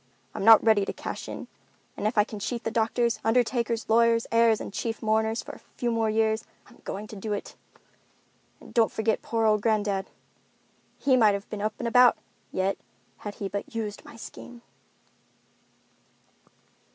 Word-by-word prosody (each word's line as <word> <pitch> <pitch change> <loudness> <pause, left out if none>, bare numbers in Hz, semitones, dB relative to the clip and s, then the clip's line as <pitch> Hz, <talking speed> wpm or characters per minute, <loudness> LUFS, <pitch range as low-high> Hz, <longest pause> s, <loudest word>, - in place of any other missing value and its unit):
I'm - - -4
not 225 +1 +8
ready 220 -3 +4
to - - -4
cash - - -6
in, - - -7 0.5
and 210 - -1
if 220 - -3
I 210 - +6
can 210 0 -8
cheat 235 +3 -3
the 225 - -2
doctors, 230 +1 +1
undertakers, 235 0 +1
lawyers, 230 +1 +3
heirs, 230 -1 +4
and - - -7
chief 225 0 -3
mourners 220 +1 +1
for - - -8
a - - -12
few 240 -1 -4
more 225 -1 +1
years, 220 +1 +1 0.2
I'm - - -20
going 205 +2 -5
to - - -8
do 210 +1 -4
it. 205 - -6 1.0
And - - -15
don't 230 -3 +3
forget 220 0 0
poor 225 -1 -1
old 215 -1 +3
granddad. 205 -3 0 0.9
He 270 -2 +3
might 215 -5 +5
have 200 +1 -6
been 210 - -4
up 215 +1 -1
and 240 - -3
about 250 +1 +6 0.3
yet 190 +1 -1 0.4
had 205 -1 -7
he 200 - -4
but 200 +3 -6
used 210 -3 -4
my - - -13
scheme." 235 +1 -11
220 Hz, 175 wpm, -27 LUFS, 210-230 Hz, 1.0 s, not